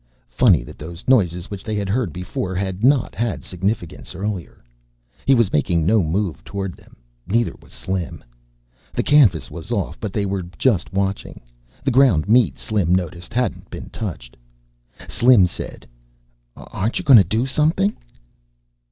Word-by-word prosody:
Funny 95 - +4
that - - -12
those 85 +3 -9
noises 90 -9 +2
which 100 -1 -6
they 110 - -3
had 100 -1 -2
heard 105 -2 0
before 90 +2 -4
had 95 +1 -3
not 135 -2 +3
had 100 - -2
significance 90 -1 -4
earlier. 95 -1 -5 0.6
He 135 - +6
was 115 -5 +2
making 85 +2 +1
no 110 +4 +4
move 85 -1 -2
toward 95 -2 -4
them. - - -20 0.3
Neither 115 +3 +1
was - - -19
Slim. 90 -5 -4 0.7
The - - 0
canvas 120 - +4
was 85 +6 -8
off 100 -6 -2
but 105 - -4
they 100 0 -1
were 95 -1 -2 0.2
just 110 -12 +1
watching. 95 0 -2 0.4
The 135 - +1
ground 120 - +4
meat, 120 +2 +4
Slim 95 -5 +1
noticed, 90 +1 -4
hadn't 125 +2 -2
been - - -9
touched. 80 - -6 0.7
Slim 120 -6 +5
said, 90 - -7 0.7
"Aren't 110 +5 -3
you - - -4
going 135 -4 +9
to - - +6
do 110 +8 0
something?" 160 +9 +1
100 Hz, 155 wpm, -21 LUFS, 90-115 Hz, 0.7 s, going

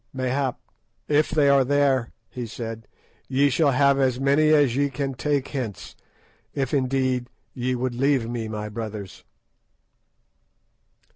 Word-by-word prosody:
"Mayhap; 130 0 -1 0.5
if 150 +1 +2
they 150 -2 +3
are 140 -1 +5
there," 135 -3 +1 0.2
he 120 0 -6
said, 115 -1 -7 0.4
"ye 140 +2 +2
shall 155 +2 +3
have 140 +1 +3
as 130 -2 +1
many 140 +3 +3
as 145 -6 +4
ye 140 +1 +1
can 135 0 -3
take 140 +1 -1
hence—if 130 - -7
indeed 130 -2 0 0.3
ye 125 0 -1
would 125 0 -2
leave 135 -1 +1
me, 115 -1 -4
my 105 -1 -5
brothers." 105 -3 -7
130 Hz, 130 wpm, -24 LUFS, 120-140 Hz, 0.5 s, are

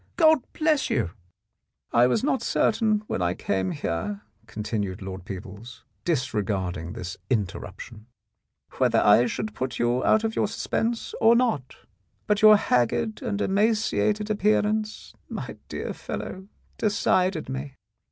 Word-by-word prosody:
"God 315 -3 +6
bless 310 -3 +1
you! 110 -9 0 0.4
" - - -55 0.3
"I 120 +1 +6
was 170 - +1
not 270 -2 +1
certain, 215 -1 +1
when 95 - -3
I 90 0 +1
came 95 -1 -1
here," 100 - -3 0.3
continued 105 -4 -3
Lord 95 -1 -7
Peebles, 100 +4 -9 0.2
disregarding 100 - -1
this 90 0 -6
interruption, 110 0 -4 0.7
"whether - - +4
I 110 +4 +5
should 210 - -4
put 130 0 -3
you 120 +1 +1
out 220 0 +4
of 225 0 -1
your - - +1
suspense 225 +2 -2
or 225 +1 +6
not, 225 - 0 0.5
but 210 0 +1
your 215 -1 +9
haggard 165 - 0
and 205 - -2
emaciated 215 +1 +1
appearance, 215 +1 0 0.2
my - - -6
dear - - -4
fellow, 190 +1 -6 0.3
decided 185 -5 +1
me. 135 +1 -5
140 Hz, 135 wpm, -25 LUFS, -, 0.7 s, your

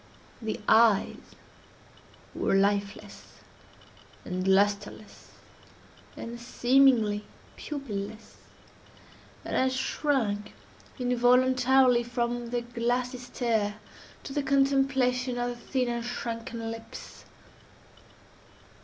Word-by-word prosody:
The 220 -1 -3
eyes 220 -3 +3 1.0
were - - 0
lifeless, 200 +1 -1 0.9
and 185 +1 -3
lustreless, 205 +2 0 0.9
and 235 +1 -7
seemingly 240 -4 +3 0.3
pupilless, 220 -7 -6 1.1
and - - -3
I 260 - +3
shrank 255 -6 -1 0.4
involuntarily 250 0 +4
from 240 0 -2
their 240 0 -1
glassy 245 +1 -2
stare 230 -4 -1 0.5
to 270 - -7
the 290 - 0
contemplation 270 -2 +1
of 245 0 -1
the 245 - -5
thin 255 +1 -2
and 235 -1 -2
shrunken 230 -1 -5
lips. 225 0 -10
240 Hz, 85 wpm, -28 LUFS, 220-255 Hz, 1.1 s, involuntarily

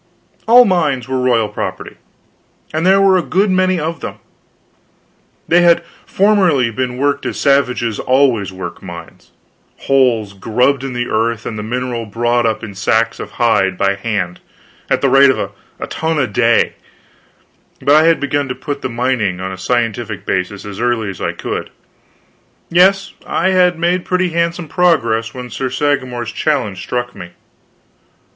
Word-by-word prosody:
All 245 +2 +8
mines 145 - 0
were 130 0 -1
royal 120 -4 +2
property, 105 - -6 0.8
and 160 +3 0
there 195 +1 +5
were 195 -1 +5
a - - +1
good 195 +3 +1
many 185 -1 +2
of 160 +2 -3
them. - - -6 1.3
They 175 +1 +4
had 170 0 +4 0.2
formerly 185 - +2
been 125 +1 -3
worked 140 +1 0
as - - -4
savages 125 -5 +1
always 130 -7 +2
work 95 -2 -7
mines 85 -2 -11 0.5
holes 120 -7 +2
grubbed 125 +7 0
in 135 -2 -4
the 120 0 -2
earth 115 +1 -1
and 115 - -4
the 105 - -4
mineral 120 0 -3
brought 120 +2 0
up 110 0 -2
in 105 -3 -7
sacks 110 +4 0
of - - -8
hide 95 -6 +1
by 100 +1 +2
hand, 100 -3 -3 0.5
at - - +1
the 140 - +3
rate 135 +1 +6
of 130 - -1 0.3
a - - -3
ton 160 0 -2
a 140 - +2
day; 115 +1 +2 1.1
but 145 - +2
I 155 +1 +6
had 165 0 +4
begun 145 0 -1
to 125 - -4
put 145 -2 -5
the 130 - -3
mining 115 -6 -1
on 95 0 -4
a - - -5
scientific 115 +1 -2
basis 95 +2 -2
as 100 -1 -7
early 120 -4 0
as 95 - -11
I - - -1
could. - - -5 1.0
Yes, 190 +3 +3
I 185 - +1
had 180 -2 +3
made 175 +2 0
pretty 185 0 0
handsome 170 0 -1
progress 115 -11 +1
when 125 -1 -7
Sir 130 +4 -3
Sagramor's 130 -4 -1
challenge 120 -7 -1
struck 120 +3 -3
me. 85 0 -10
125 Hz, 165 wpm, -16 LUFS, 110-160 Hz, 1.3 s, All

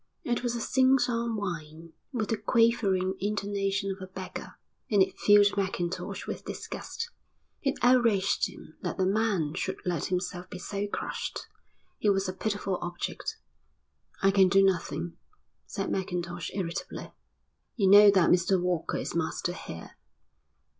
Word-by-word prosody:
It 240 -1 0
was 240 -1 -1
a - - -2
sing 260 +2 +4
song 235 -2 0
whine, 165 -5 -5 0.2
with 225 -6 -2
the 225 - +1
quavering 210 -4 +2
intonations 200 -1 -1
of 190 - -16
a 185 0 -8
beggar, 185 0 -7 0.3
and 205 - +3
it - - -5
filled 205 0 +6
Mackintosh 185 -3 -2
with - - -5
disgust. 460 +1 -6 0.5
It 275 -2 0
outraged 230 -6 +3
him - - -14
that - - -3
the 190 - +2
man 195 -6 +1
should 190 +2 -2
let 175 -4 -1
himself 180 0 -3
be - - -7
so 200 +2 -3
crushed. - - -4 0.5
He 210 - +2
was 195 -1 +2
a 185 - -2
pitiful 200 -2 -2
object. 175 0 -4 0.9
"I 195 - +6
can 195 -1 +5
do 195 +1 +5
nothing," 170 -3 0 0.5
said - - -3
Mackintosh 175 -3 -3
irritably. 175 -4 -4 0.6
"You 200 -5 +2
know 205 +1 +9
that 190 -4 +4
Mr 180 +1 +3
Walker 175 -2 -1
is - - -4
master 170 +1 -1
here." 85 - -9
195 Hz, 145 wpm, -29 LUFS, 180-210 Hz, 0.9 s, know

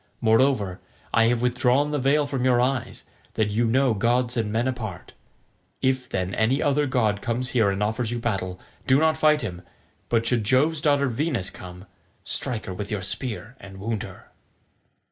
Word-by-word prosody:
Moreover, 110 -5 +2 0.3
I 115 - +5
have 120 +1 +1
withdrawn 125 +4 +2
the 150 - 0
veil 140 +3 +2
from 135 -3 -3
your 125 -2 +3
eyes, 130 0 -1 0.3
that 105 -1 +1
you 115 +3 +1
know 130 +1 +3
gods 120 +4 +1
and 110 -3 -1
men 115 +4 0
apart. 110 -8 -5 0.7
If, 130 -1 0
then, 95 0 -2
any 120 +6 +1
other 145 0 +1
god 110 -6 +1
comes 125 +1 -2
here 110 -5 +3
and 100 +1 -1
offers 110 +2 -1
you 120 - -2
battle, 95 -6 -3 0.3
do 130 +1 +5
not 160 0 +3
fight 155 -2 +3
him; 90 -5 -5 0.5
but 115 -1 +1
should 120 -2 +1
Jove's 145 +8 +2
daughter 145 -2 +3
Venus 125 - -2
come, 90 +1 -11 0.4
strike 125 -5 -2
her 95 - -5
with 100 +2 -6
your 105 -3 -3
spear 110 +3 -3
and 95 -1 -11
wound 105 +1 -3
her." 95 - -11
120 Hz, 180 wpm, -24 LUFS, 105-130 Hz, 0.7 s, I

